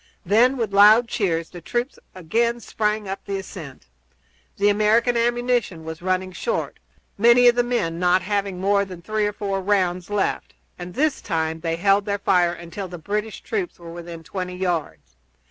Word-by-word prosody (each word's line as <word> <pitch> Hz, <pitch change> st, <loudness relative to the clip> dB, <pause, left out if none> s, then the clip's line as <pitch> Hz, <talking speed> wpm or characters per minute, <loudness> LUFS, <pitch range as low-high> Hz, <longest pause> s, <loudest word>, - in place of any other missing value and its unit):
Then, 235 Hz, +8 st, +4 dB
with 220 Hz, -5 st, -2 dB
loud 215 Hz, +4 st, +7 dB
cheers, 170 Hz, -8 st, -1 dB
the 175 Hz, -, -10 dB
troops 240 Hz, -, -3 dB, 0.2 s
again 235 Hz, +7 st, 0 dB
sprang 210 Hz, -2 st, -2 dB
up 195 Hz, +1 st, -5 dB
the 200 Hz, -1 st, -3 dB
ascent. 165 Hz, -, -9 dB, 0.7 s
The 200 Hz, -, +2 dB
American 215 Hz, +4 st, +3 dB
ammunition 240 Hz, -6 st, 0 dB
was 160 Hz, +1 st, -7 dB
running 185 Hz, +1 st, -1 dB
short, 480 Hz, -, -3 dB, 0.4 s
many 235 Hz, +2 st, +6 dB
of 240 Hz, -, +7 dB
the 245 Hz, -, +2 dB
men 235 Hz, -9 st, -1 dB
not 180 Hz, +1 st, +3 dB
having 200 Hz, -2 st, -2 dB
more 200 Hz, +1 st, +2 dB
than 185 Hz, -3 st, -9 dB
three 215 Hz, +1 st, 0 dB
or 205 Hz, -, -3 dB
four 195 Hz, -1 st, -3 dB
rounds 185 Hz, -2 st, 0 dB
left, 205 Hz, -1 st, -2 dB, 0.2 s
and 175 Hz, 0 st, -8 dB
this 295 Hz, +1 st, +1 dB
time 160 Hz, -3 st, -2 dB
they 165 Hz, 0 st, -2 dB
held 195 Hz, +3 st, +2 dB
their 200 Hz, -1 st, -1 dB
fire 180 Hz, -3 st, +2 dB
until 175 Hz, +3 st, -7 dB
the 180 Hz, 0 st, -8 dB
British 210 Hz, +6 st, -4 dB
troops 380 Hz, -6 st, -3 dB
were 170 Hz, -1 st, -10 dB
within 170 Hz, -1 st, -8 dB
twenty 180 Hz, +1 st, -5 dB
yards. 170 Hz, -, -3 dB
200 Hz, 175 wpm, -23 LUFS, 175-220 Hz, 0.7 s, loud